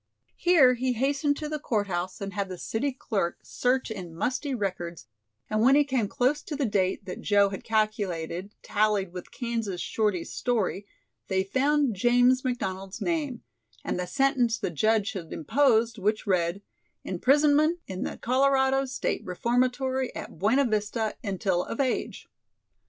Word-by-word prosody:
Here 325 -8 +5
he 250 +1 0
hastened 280 +4 +1
to 305 - -4
the 305 0 -3
court 220 -7 0
house 185 0 -4
and 200 0 -4
had 200 -1 -2
the 185 - -6
city 230 +10 -2
clerk 200 -9 -2
search 250 -1 0
in 180 -6 -7
musty 260 - -1
records 180 - -4 0.4
and 215 0 0
when 260 +4 +6
he 295 - +6
came 260 -6 0
close 280 +6 +1
to 300 - -6
the 285 -1 0
date 190 -4 0
that 180 - -6
Joe 200 -1 +4
had 195 +2 -7
calculated 205 -5 -1
tallied 205 -3 +1
with 180 -1 -8
Kansas 230 -7 -3
Shorty's 205 -6 -1
story, 210 -4 -1 0.4
they 190 -1 +1
found 270 +4 +1
James 245 +5 +4
McDonald's 195 -7 -3
name, 300 -8 -2 0.4
and - - -2
the 180 - -2
sentence 245 +1 +2
the - - -3
judge 215 - +2
had 185 -7 -7
imposed 230 - +2
which 210 +2 0
read: 185 0 0 0.4
"Imprisonment 295 - +3
in 185 -1 -6
the - - -3
Colorado 270 +1 +2
State 260 - -2
Reformatory 255 +6 0
at - - -8
Buena 255 +9 +3
Vista 215 0 -1
until 190 -3 0
of - - -6
age." 260 -2 -1
225 Hz, 155 wpm, -27 LUFS, 195-265 Hz, 0.4 s, when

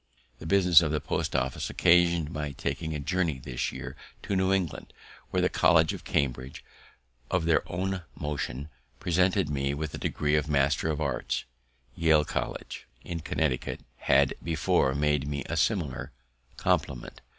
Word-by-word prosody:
The - - -7
business 90 -3 +6
of 80 -3 0
the 75 - +1
post 70 - -2
office 65 -1 -1
occasion'd 85 -2 +3
my 75 -3 -4
taking 70 +4 -3
a - - -3
journey 80 0 0
this 65 -1 -3
year - - -7 0.3
to 100 - -2
New 95 0 +2
England, 95 -5 -1 0.4
where - - 0
the - - +5
College 80 -1 +4
of - - -8
Cambridge, 65 -1 -2 0.6
of 90 -3 +1
their 85 -1 +4
own 95 +1 -2
motion, 75 -2 -4 0.3
presented 90 +1 +2
me 70 -1 -1
with 80 0 -4
the - - -6
degree 75 0 -1
of 75 0 0
Master 70 +2 +2
of 75 -1 -1
Arts. 70 -2 -1 0.5
Yale 80 -2 +3
College, - - -4 0.2
in 85 -1 -4
Connecticut, 75 -4 -1 0.2
had 70 -1 +3
before 75 -4 +1
made 75 -1 +1
me 70 -1 -3
a - - -3
similar - - 0 0.5
compliment. 65 -3 -1
75 Hz, 155 wpm, -28 LUFS, 70-85 Hz, 0.6 s, business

